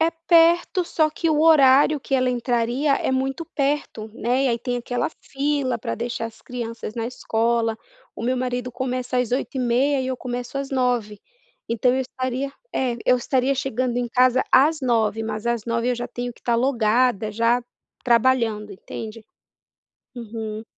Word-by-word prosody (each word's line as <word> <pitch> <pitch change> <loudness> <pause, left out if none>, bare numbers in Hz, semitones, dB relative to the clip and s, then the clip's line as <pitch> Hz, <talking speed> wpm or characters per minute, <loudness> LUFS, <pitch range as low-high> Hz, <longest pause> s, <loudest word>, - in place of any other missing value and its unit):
É 325 +1 +3 0.2
perto, 340 +2 +4
só 315 -2 +1
que 325 +1 -1
o 300 - +2
horário 290 -1 +6
que 270 - -2
ela 255 -1 +2
entraria 245 +3 +1
é 260 - -1
muito 270 +5 -1
perto, 275 -6 -1
né, 250 +4 0
e 265 - +3
aí 235 - 0
tem 245 +1 -2
aquela 245 +1 -2
fila 275 -3 -1
para - - -3
deixar 235 0 -4
as 225 -1 -13
crianças 230 -3 -6
na 230 0 -2
escola, 230 -2 0 0.4
o - - -6
meu 255 +2 0
marido 250 0 -3
começa 255 0 -3
às 250 -2 0
08:30 260 +1 +1
e 260 - -3
eu 260 - -2
começo 245 +1 -5
às 275 -1 -4
09:00, 245 -6 0 0.5
então 240 +2 +2
eu 265 - 0
estaria 260 +1 -3 0.2
é, 250 -3 0
eu 250 - +5
estaria 260 +2 +1
chegando 255 -2 -1
em 245 -1 -1
casa 255 +1 +3
às 300 +3 +4
09:00, 225 -3 +1
mas 215 0 -4
às 235 -2 -1
09:00 230 +1 -1
eu - - +1
já 240 0 -5
tenho 245 0 -5
que - - -23
estar 235 -1 +1
logada 235 -3 +2
já 230 +3 +2 0.4
trabalhando, 230 -4 +2
entende? 220 +2 -8 0.9
Uhum. 220 -2 -6
245 Hz, 170 wpm, -23 LUFS, 230-265 Hz, 0.9 s, horário